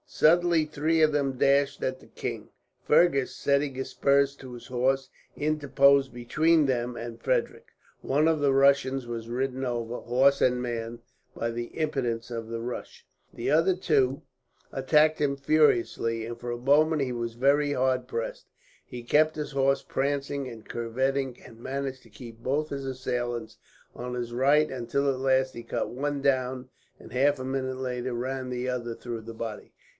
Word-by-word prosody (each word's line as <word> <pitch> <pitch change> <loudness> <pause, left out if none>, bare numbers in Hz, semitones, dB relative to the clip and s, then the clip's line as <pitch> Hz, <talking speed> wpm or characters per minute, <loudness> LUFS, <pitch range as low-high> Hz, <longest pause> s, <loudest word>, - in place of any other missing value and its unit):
Suddenly 170 0 +3
three 155 +2 0
of 155 - +5
them 140 -2 +1
dashed 140 +1 +2
at 130 0 -2
the - - -17
king. - - -6 0.3
Fergus, 150 -4 +3
setting 140 -1 0
spurs 140 +1 +2
to 130 -2 -10
his 120 - -10
horse, 130 +1 0 0.3
interposed 140 -2 +3
between 155 +6 +2
them 125 -2 -1
and 115 0 -7
Frederick. - - -1 0.3
One 150 +4 +2
of 160 -1 +2
the 140 -2 +3
Russians 135 -2 +3
was 115 -1 -5
ridden 130 +2 -2
over, 120 -1 -3
horse 135 +3 +3
and 125 -1 +3
man, 115 -1 -4 0.4
by 115 0 -2
the 120 +1 -3
impetus 130 -7 -2
of 115 -2 -5
his 115 0 -4
rush. 120 +2 -7 0.3
The - - -2
other 165 +5 +4
two 140 -7 +1 0.5
attacked 150 +4 +3
him 140 -1 +1
furiously, 120 -6 +2
and 115 0 -6
for 120 0 -5
a 120 - -3
moment 145 +4 +3
he 130 - -2
was 120 -1 -3
very 145 +3 +3
hard 130 -1 0
pressed. - - -5 0.4
He 120 -1 -9
kept 155 +6 +3
his 150 -1 -4
horse 135 0 +1
prancing 140 0 -2
and 115 -3 -10
curvetting, 130 +2 -2
and 115 - -14
managed 135 +1 -4
to 115 - -18
keep 115 +1 -11
both 145 +6 -1
his 140 -1 -5
assailants 120 -3 -3 0.4
on 125 0 -5
his 120 -1 -4
right; 145 +5 +3
until 130 +2 -1
at 130 -1 -1
last 130 0 +2
he 120 - -8
cut - - -3
one 145 +2 -3
down 130 -2 0 0.3
and, - - -13
half 140 +2 +2
a 130 - -5
minute 130 -1 -2
later, 125 -1 -3
ran 130 +2 -3
the 125 0 -3
other 120 -2 -2
through 115 -1 -6
the 115 +1 -9
body. 110 -2 -6
130 Hz, 170 wpm, -27 LUFS, 120-140 Hz, 0.5 s, of